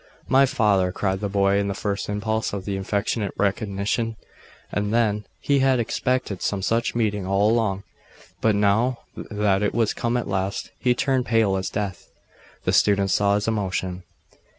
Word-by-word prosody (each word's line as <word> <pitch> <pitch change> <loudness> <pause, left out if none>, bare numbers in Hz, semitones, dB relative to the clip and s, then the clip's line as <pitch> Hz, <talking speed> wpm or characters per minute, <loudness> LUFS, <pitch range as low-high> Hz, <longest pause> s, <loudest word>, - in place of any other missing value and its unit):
'My 135 +1 +5
father,' 105 -8 +2
cried 95 0 -1
the 100 0 -2
boy, 100 0 +2
in 100 - 0
the 100 - -2
first 100 +1 -3
impulse 110 +2 -1
of 100 -1 -5
affectionate 100 +1 -2
recognition; 100 +3 -1 0.6
and 105 0 -1
then 105 -3 +1
he 140 -1 +2
had 130 -1 +3
expected 120 -3 -1
some 100 -2 -1
such 115 +3 0
meeting 105 -4 0
all 100 +2 +3
along, 105 -4 0 0.6
but 110 -2 +3
now 110 +5 +2
that 105 -2 0
it 105 - 0
was 115 -2 +2
come 120 +1 -1
at 120 - -3
last, 95 0 -2
he 125 -1 +2
turned 130 0 0
pale 110 -4 +3
as 95 0 -2
death. 100 -3 -4 0.5
The - - 0
students 100 -2 +3
saw 100 0 +3
his 105 +1 -1
emotion. 95 -4 -2
105 Hz, 165 wpm, -23 LUFS, 100-115 Hz, 0.6 s, My